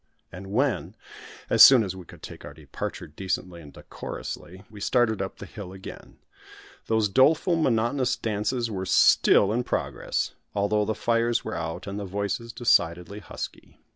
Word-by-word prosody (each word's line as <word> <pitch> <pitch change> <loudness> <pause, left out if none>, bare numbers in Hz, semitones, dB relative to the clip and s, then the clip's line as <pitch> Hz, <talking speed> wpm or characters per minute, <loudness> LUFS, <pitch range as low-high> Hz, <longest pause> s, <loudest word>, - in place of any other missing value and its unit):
And 95 +2 -9
when, 130 +2 0 0.5
as - - +3
soon 130 -4 +10
as 95 -2 -4
we 90 -2 -10
could - - -15
take - - -9
our - - -10
departure - - -6
decently 90 +1 -4
and 75 -2 -13
decorously, 95 +6 -8
we 105 -3 -13
started 110 -3 +1
up 95 - -5
the - - -8
hill 100 -2 -9
again, 95 0 -11 0.7
those 110 -1 +2
doleful 150 - +3
monotonous 125 -3 +1
dances 115 +2 -2
were 95 -2 -4
still 100 +1 +5
in 120 +2 0
progress, - - -2 0.2
although 105 +1 +1
the 110 +1 -2
fires 115 0 0
were - - -4
out, 80 -1 -5
and 100 0 -5
the 100 - -5
voices 100 +4 -3
decidedly 90 -4 +1
husky. - - -9
105 Hz, 160 wpm, -26 LUFS, 95-115 Hz, 0.7 s, soon